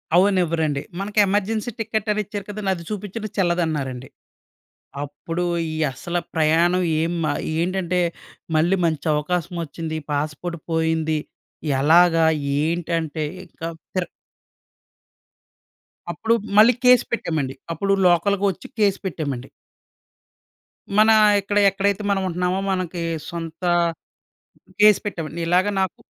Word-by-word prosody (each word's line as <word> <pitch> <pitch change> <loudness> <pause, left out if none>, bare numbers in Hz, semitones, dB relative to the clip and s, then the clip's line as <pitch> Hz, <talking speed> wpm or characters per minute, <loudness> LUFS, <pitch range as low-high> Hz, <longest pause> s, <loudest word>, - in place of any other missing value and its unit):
అవ్వనివ్వరండి. 170 -6 +2 0.2
మనకి 205 +2 -1
emergency 210 +4 -1
ticket 220 -1 -2
అని 210 0 0
ఇచ్చారు 205 0 -6
కదండీ! 205 -1 -3
అది 170 - -9
చూపించిన 210 +1 -5
చెల్లదన్నారండి. 155 -8 -1 0.9
అప్పుడు 165 +4 -4 0.3
ఈ - - -4 0.2
అస్స‌లా 175 +7 -3
ప్రయాణం 165 +3 +3 0.2
ఏం 165 +2 0
మా 150 - +1 0.3
ఏంటంటే, 180 +1 0 0.6
మళ్ళీ 170 +5 +3
మంచి 160 -1 -2
అవకాశం 170 +3 -2
వచ్చింది. 160 +1 -5
పాస్‌పోర్ట్ 155 +4 -3
పోయింది. 160 -1 +1 0.6
ఎలాగా? 165 +2 +5 0.4
ఏంటంటే 165 -1 -1 0.2
ఇంకా 165 -1 -7 0.3
పిర్ 185 -2 -1 2.0
అప్పుడు 225 +7 0 0.2
మళ్ళి 225 +4 +8
కేస్ 250 0 +7
పెట్టామండి 155 - -2 0.2
అప్పుడు 195 +4 0
లోకల్‌గా 195 +3 +2
వచ్చి 190 - -11
కేస్ 200 -2 +3
పెట్టామండి. 140 -8 -3 1.5
మన 215 +1 +6 0.3
ఇక్కడ 200 +1 -2
ఎక్కడైతే 200 +1 0
మనం 195 -1 +1
ఉంటున్నామో 180 +1 -1
మనకి 185 -2 -2 0.3
సొంత 165 0 -7 1.2
కేస్ 210 -1 +7
పెట్టామండి. 170 -4 -4
ఇలాగ 180 +2 +3 0.2
నాకు 190 - -2
175 Hz, 110 wpm, -22 LUFS, 160-195 Hz, 2.0 s, మళ్ళి